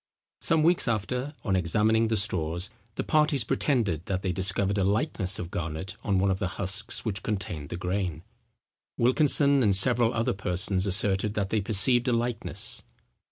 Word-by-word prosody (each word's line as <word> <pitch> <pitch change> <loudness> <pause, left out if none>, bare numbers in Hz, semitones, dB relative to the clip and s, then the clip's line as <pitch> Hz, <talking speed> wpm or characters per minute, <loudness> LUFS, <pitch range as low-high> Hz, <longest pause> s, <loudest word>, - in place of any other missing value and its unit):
Some 160 -2 +1
weeks 170 -1 +2
after, 125 +6 -3
on 100 -3 0
examining 105 +6 +2
the 110 0 0
straws, 90 -1 0 0.2
the - - -3
parties 150 -4 +2
pretended, 105 - -1
that 95 -1 -3
they 95 - -1
discovered 95 +2 0
a - - +1
likeness 100 - -1
of 85 0 -7
Garnet 85 +5 -5
on 100 -2 0
one 95 +1 +1
of 95 - -2
the 100 - -1
husks 100 +4 -3
which 100 -3 -3
contained 90 -8 -4
the - - -5
grain. 90 -3 -3 0.7
Wilkinson 140 +2 +4
and 100 -5 +3
several 115 +3 +4
other 115 -1 -1
persons 95 +1 0
asserted 100 +2 +1
that 100 -2 -2
they 110 - +1
perceived 115 +5 +4
a 125 - +2
likeness. 120 0 -2
100 Hz, 165 wpm, -26 LUFS, 95-115 Hz, 0.7 s, Wilkinson